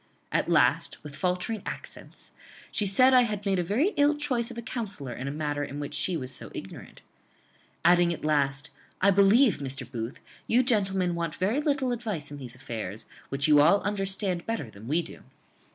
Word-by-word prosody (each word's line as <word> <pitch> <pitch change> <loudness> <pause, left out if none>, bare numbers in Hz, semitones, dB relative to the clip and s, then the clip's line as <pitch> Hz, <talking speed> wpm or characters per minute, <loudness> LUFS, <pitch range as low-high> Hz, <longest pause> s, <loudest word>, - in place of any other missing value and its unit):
At - - 0
last, - - +3
with 145 -2 -9
faltering 180 +7 -1
accents, - - -8 0.4
she 205 - +1
said 255 +7 +5
I 255 - +8
had 210 -4 -2
made 195 -2 +1
a - - +1
very 230 - +2
ill 290 +1 +4
choice 250 -6 0
of 240 - -9
a - - -3
counsellor 205 - -4
in 130 +3 -6
a - - -2
matter 145 -1 -2
in 140 0 -6
which 145 - -5
she 180 -2 0
was 130 -3 -5
so - - -7
ignorant. - - -9 0.8
Adding, 175 0 +5
at 165 - -5
last, 145 -1 +1 0.3
'I 200 +1 +5
believe, 200 +5 +5
Mr. 135 -1 -4
Booth, 120 0 -6 0.3
you 245 +3 +4
gentlemen 195 -7 +1
want 170 -2 -3
very 215 +10 0
little 280 -4 0
advice 215 -12 -4
in 145 - -7
these 125 -2 -7
affairs, 110 -4 -6 0.2
which 140 +3 +1
you 150 -1 +6
all 200 +7 +5
understand 195 -2 -1
better 225 - -3
than 105 +3 -12
we 160 +5 +1
do. - - -11
180 Hz, 190 wpm, -27 LUFS, 145-220 Hz, 0.8 s, I